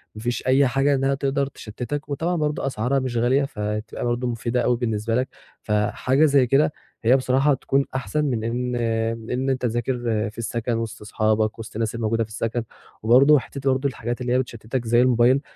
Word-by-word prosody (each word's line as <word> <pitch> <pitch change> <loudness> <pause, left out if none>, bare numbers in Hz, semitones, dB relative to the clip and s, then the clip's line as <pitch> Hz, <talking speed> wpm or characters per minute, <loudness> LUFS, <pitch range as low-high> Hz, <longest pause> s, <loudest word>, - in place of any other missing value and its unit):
ما 110 - -8
فيش 120 +2 -2
أي 135 +1 +5
حاجة 135 +3 +2
إنها 135 +1 +1
تقدر 140 0 0
تشتِّتك، 135 +4 -6
وطبعًا 165 +5 -1
برضه 150 -3 -1
أسعارها 130 +2 0
مش 130 -2 -3
غالية، 125 +4 +3
فهتبقى 105 -3 -4
برضه 120 +1 -1
مفيدة 120 +1 -1
أوي 120 0 +2
بالنسبة 115 -1 -1
لك، 130 +2 +1 0.3
فحاجة 110 +7 +1
زي 140 -4 +4
كده 140 +4 +3 0.3
هي 125 +4 +5
بصراحة 135 +2 +2
تكون 135 +1 0
أحسن 150 +3 -1
من 120 -6 -1
إن 125 +2 -2
آآ، 115 -1 0
من 125 +4 -3
إن 130 - +1
تذاكر 120 +1 -1 0.4
في 115 - -23
السَكَن 115 +1 -2
وسط 115 0 -5
أصحابك 110 +1 0
وسط 110 - -9
الناس 115 0 -2
الموجودة 115 0 0
في 110 - -10
السَكَن، 115 +2 -2 0.4
وبرضه 135 +6 +6
حتة 135 +1 -2
برضه 135 +2 +1
الحاجات 120 -1 -5
اللي 125 0 0
هي 130 - +3
بتشتِّتك 120 0 -4
زي 120 +1 +4
الموبايل 125 +1 +4
125 Hz, 190 wpm, -23 LUFS, 115-135 Hz, 0.4 s, وبرضه